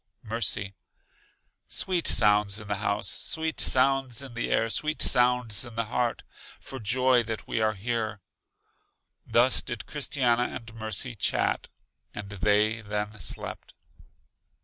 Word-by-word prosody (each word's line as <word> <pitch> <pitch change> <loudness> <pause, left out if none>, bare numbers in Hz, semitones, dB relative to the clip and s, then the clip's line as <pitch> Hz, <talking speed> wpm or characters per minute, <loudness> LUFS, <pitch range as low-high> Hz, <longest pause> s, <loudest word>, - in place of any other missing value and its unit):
Mercy: 105 -2 0 0.9
Sweet 180 -3 +1
sounds 105 -2 +4
in 105 - -10
the 100 -1 -1
house, 100 0 0
sweet 160 -1 -1
sounds 135 -1 +2
in 130 -3 -8
the 120 - -3
air, 115 - +2
sweet 155 +4 0
sounds 125 -3 +3
in 120 -3 -10
the 115 0 -1
heart, 120 -1 0 0.4
for 135 - -8
joy 125 +3 +3
that 110 -2 -5
we 110 - -1
are 110 0 +1
here. 110 0 -2 1.1
Thus 120 +2 +3
did 120 -2 -6
Christiana 125 -4 0
and 115 -2 -8
Mercy 110 +2 -3
chat, 105 - 0 0.5
and 105 -1 -7
they, 105 +2 +2
then 105 0 -4
slept. - - -5
115 Hz, 130 wpm, -27 LUFS, 105-125 Hz, 1.1 s, sounds